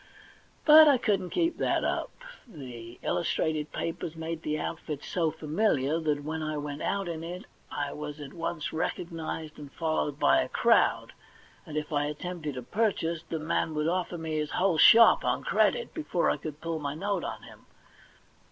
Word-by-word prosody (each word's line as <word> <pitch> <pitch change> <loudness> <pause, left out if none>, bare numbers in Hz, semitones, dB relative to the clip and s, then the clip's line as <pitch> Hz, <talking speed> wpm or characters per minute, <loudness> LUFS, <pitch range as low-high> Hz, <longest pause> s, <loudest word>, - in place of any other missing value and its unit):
But 310 0 +9
I 280 -3 +6
couldn't 200 -6 0
keep 335 -1 0
that - - +1
up. - - -1 0.4
The 125 - -10
illustrated 155 -3 -1
papers 165 -1 -4
made 160 0 -5
the 150 -1 -2
outfit 150 -2 -5
so' 165 -3 0
familiar 155 -2 0
that 150 -3 -1
when 160 +2 -4
I 155 0 -2
went 145 0 -5
out 200 -2 -1
in 165 -1 -4
it 175 +2 -7 0.3
I 145 -1 -3
was 150 0 -6
at 140 -2 -9
once 165 -2 -4
recognised 160 -1 -4
and 145 -2 -10
followed 155 -3 -1
by - - +4
a - - -3
crowd, - - +2 0.5
and 155 - -5
if 150 0 -3
I 145 0 +1
attempted 150 -1 -5
a 125 - -5
jDurchase 170 - 0
the 165 - -2
man 155 0 -1
would 150 +1 0
offer 180 0 -1
me 160 -1 -3
his 150 -1 -1
whole 180 -4 +1
shop 230 +7 +8
on - - 0
credit 485 -1 +1
before 300 - 0
I - - -1
could 155 -1 -8
pull 165 -1 -3
my 145 -1 -3
note 200 +2 -2
on - - -5
him. - - -15
160 Hz, 180 wpm, -28 LUFS, 150-175 Hz, 0.5 s, But